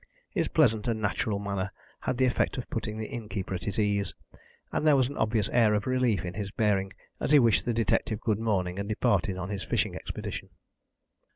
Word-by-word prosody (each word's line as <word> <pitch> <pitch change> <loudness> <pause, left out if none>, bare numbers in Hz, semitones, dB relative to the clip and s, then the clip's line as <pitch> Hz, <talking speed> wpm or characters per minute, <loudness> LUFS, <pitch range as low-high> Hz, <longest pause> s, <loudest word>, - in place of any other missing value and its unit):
His - - 0
pleasant 115 -7 +3
and 115 -2 0
natural 105 0 0
manner 100 -1 -2 0.3
had 125 - -2
the 130 - +4
effect 125 - +1
of 125 - -4
putting 110 -1 -3
the 110 - -3
innkeeper 105 -6 -4
at 90 - -4
his 100 - -3
ease, 100 -2 0 0.6
and 155 - 0
there 150 - +7
was 130 -2 +3
an 145 - -7
obvious 110 -2 +1
air 110 -3 +4
of 105 - -1
relief 125 -8 +1
in 90 - -4
his 100 0 -4
bearing 100 -3 +1 0.3
as - - -1
he 150 - +7
wished 115 -6 +4
the 120 - +1
detective 110 -1 +1
good 110 -2 0
morning 95 -5 0
and 100 +1 -3
departed 110 -3 +1
on 95 +1 -4
his 100 -1 -3
fishing - - 0
expedition. - - -6
105 Hz, 205 wpm, -28 LUFS, 100-120 Hz, 0.6 s, there